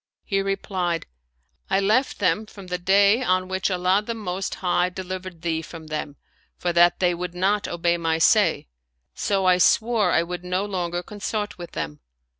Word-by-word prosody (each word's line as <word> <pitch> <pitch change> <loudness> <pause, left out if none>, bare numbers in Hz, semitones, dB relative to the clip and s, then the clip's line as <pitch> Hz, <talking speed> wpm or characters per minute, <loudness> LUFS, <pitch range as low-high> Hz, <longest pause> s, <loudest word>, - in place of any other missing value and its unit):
He 195 -1 0
replied, 190 -3 -2 0.3
" 65 +1 -46
I 195 - +3
left 220 +7 +2
them 200 +2 +1
from 200 -2 -12
the 180 0 -3
day 200 +5 +4
on 185 -6 +1
which 190 +1 -1
Allah 185 +2 +2
the 230 +2 -4
Most 190 -3 -4
High 180 -1 +1
delivered 185 -2 -7
thee 160 -2 0
from 165 0 -10
them, 155 -2 -4 0.4
for 175 -1 -1
that 175 +1 +5
they 180 -1 +3
would 180 0 -5
not 200 +3 +1
obey 170 0 0
my 165 -1 0
say; 160 - +3 0.5
so 195 - 0
I 180 -1 +4
swore 220 0 +3
I 170 - +3
would 175 0 -6
no 180 +2 -1
longer 175 -3 -3
consort 210 0 -4
with 175 - -8
them." 75 -1 -4
180 Hz, 180 wpm, -24 LUFS, 175-195 Hz, 0.5 s, that